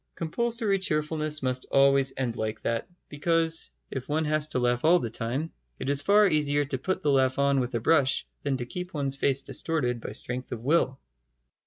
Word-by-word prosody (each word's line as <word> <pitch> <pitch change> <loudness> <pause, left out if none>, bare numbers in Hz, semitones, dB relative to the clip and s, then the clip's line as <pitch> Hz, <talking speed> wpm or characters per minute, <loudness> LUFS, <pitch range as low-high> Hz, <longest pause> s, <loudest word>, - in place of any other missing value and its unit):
Compulsory 220 +4 0
cheerfulness 155 -4 0
must 130 0 0
always 135 -1 +4
end 125 -3 -2
like 110 -1 -3
that, 115 -1 -2 0.2
because, 165 +2 +1 0.2
if 130 0 -6
one 155 +2 0
has 155 0 +1
to 155 - -2
laugh 120 0 +1
all 170 +3 +6
the 115 -10 -3
time, 130 +8 -2 0.3
it 140 - -2
is 140 0 +3
far 205 +6 +5
easier 145 -3 +1
to 135 -2 -3
put 185 +8 -2
the 145 - +2
laugh 130 -1 +2
on 140 -1 +2
with 125 -1 -2
a - - +1
brush 135 +1 +2 0.2
than 140 -2 -1
to 120 - -4
keep 180 +7 -7
one's 140 -2 -1
face 135 0 +1
distorted 125 -8 -1
by - - -6
strength 125 +4 -5
of 115 0 -6
will. 135 -3 +2
140 Hz, 195 wpm, -27 LUFS, 130-160 Hz, 0.3 s, all